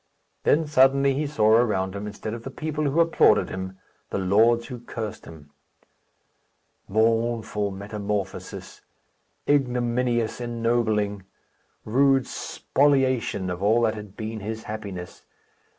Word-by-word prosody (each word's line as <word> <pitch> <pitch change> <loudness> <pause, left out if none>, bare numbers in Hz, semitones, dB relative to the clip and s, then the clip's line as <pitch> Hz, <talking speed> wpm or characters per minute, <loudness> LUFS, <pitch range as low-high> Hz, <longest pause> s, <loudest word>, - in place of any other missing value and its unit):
Then 160 +2 +3
suddenly 135 -1 +4
he 145 +2 -1
saw 110 -7 +2
around 105 -5 +2
him, 100 +1 -5
instead 105 +1 -6
of 115 - -6
the 135 - -7
people 155 +1 -3
who 145 +4 +1
applauded 165 -10 +4
him, 95 0 -6 0.3
the - - -2
lords 110 +5 +3
who 120 0 -7
cursed 115 -3 -6
him. 75 -3 -13 1.4
Mournful 110 -1 +1
metamorphosis! 100 0 -5 0.7
Ignominious 125 -4 +1
ennobling! 115 -4 0 0.6
Rude 135 +3 +3
spoliation 130 -11 0
of 90 +1 -5
all 110 +4 +3
that 110 -1 +2
had 105 -2 -10
been 110 0 -5
his 110 +2 -5
happiness! 100 -5 -7
115 Hz, 120 wpm, -25 LUFS, 105-125 Hz, 1.4 s, suddenly